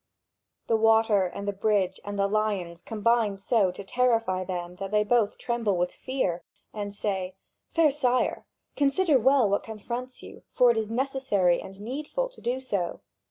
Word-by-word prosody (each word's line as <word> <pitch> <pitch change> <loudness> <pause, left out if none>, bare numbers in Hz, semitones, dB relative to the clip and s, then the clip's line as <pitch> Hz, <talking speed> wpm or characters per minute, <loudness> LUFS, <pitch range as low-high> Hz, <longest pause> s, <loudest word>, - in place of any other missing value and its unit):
The 230 - +2
water 220 -3 +4
and 200 +3 -7
the 205 - 0
bridge 195 -2 0
and 205 0 -5
the 195 - +2
lions 200 -5 -1
combine 225 -2 +1
so 200 -1 +2
to 180 +3 -7
terrify 225 -4 +1
them 180 -1 -5
that 195 0 -5
they 210 +1 +2
both 220 -1 +1
tremble 235 -6 -1
with 175 0 0
fear, 190 -10 -2 0.3
and 205 -1 -4
say: 190 -2 -3 0.4
"Fair 325 -3 +5
sire, 255 -3 0 0.3
consider 285 +1 +3
well 265 -1 +4
what 200 0 +1
confronts 240 +4 -6
you; - - -11
for 250 -2 +5
it 235 - -1
is 220 -1 -1
necessary 235 -8 +1
and 195 0 -11
needful 300 - -3
to - - -17
do 245 +2 -1
so. 200 -9 -3
215 Hz, 165 wpm, -27 LUFS, 195-250 Hz, 0.4 s, Fair